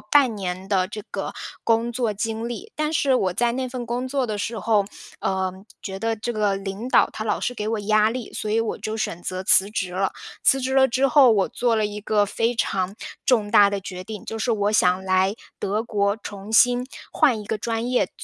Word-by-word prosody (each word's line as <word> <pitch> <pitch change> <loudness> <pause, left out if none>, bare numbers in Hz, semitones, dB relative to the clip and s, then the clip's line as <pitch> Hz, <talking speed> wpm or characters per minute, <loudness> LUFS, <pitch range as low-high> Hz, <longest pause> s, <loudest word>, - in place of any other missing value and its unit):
半 275 -6 +3
年 185 -2 -4
的 190 -2 +1
这 210 +1 -7
个 - - -4 0.3
工 230 +1 +1
作 235 -3 -1
经 225 +2 -3
历， 405 - -7
但 305 0 -1
是 280 -4 +2
我 190 -7 +1
在 240 +3 +1
那 260 +1 -2
份 250 -1 -5
工 245 +2 -3
作 270 -1 0
的 215 -2 -3
时 225 +3 -3
候， 205 0 +2 0.3
呃， 190 -1 -1 0.3
觉 190 -1 -5
得 225 +2 -1
这 240 +3 -3
个 210 -3 +1
领 195 +5 -5
导 - - +4
他 215 - -5
老 220 - 0
是 - - -2
给 215 -3 -4
我 225 0 -1
压 215 +1 +3
力， 235 0 -5
所 215 - -4
以 220 - +2
我 225 - -2
就 215 0 -4
选 175 -6 -3
择 185 +1 -4
辞 190 +1 +5
职 190 -4 -3
了。 190 +1 0 0.3
辞 270 - +4
职 260 0 -2
了 265 0 +5
之 260 +3 +2
后， 270 -1 +6
我 200 -3 +2
做 240 -2 +1
了 215 - +1
一 210 0 -4
个 210 0 +2
非 225 +4 0
常 190 -4 -1 0.3
重 220 -5 +3
大 205 -1 +7
的 200 0 -2
决 185 -1 -7
定， 210 +1 -8
就 225 - -5
是 230 +2 0
我 205 -1 +1
想 185 -2 +3
来 190 +1 +2 0.2
德 210 +3 -1
国 200 -2 0
重 200 +1 -8
新 245 +2 +5 0.3
换 265 -9 +3
一 - - -8
个 215 +1 -3
专 230 +2 -2
业 250 - +2
读 - - -29
读 - - -13
215 Hz, 250 characters per minute, -23 LUFS, 200-240 Hz, 0.3 s, 大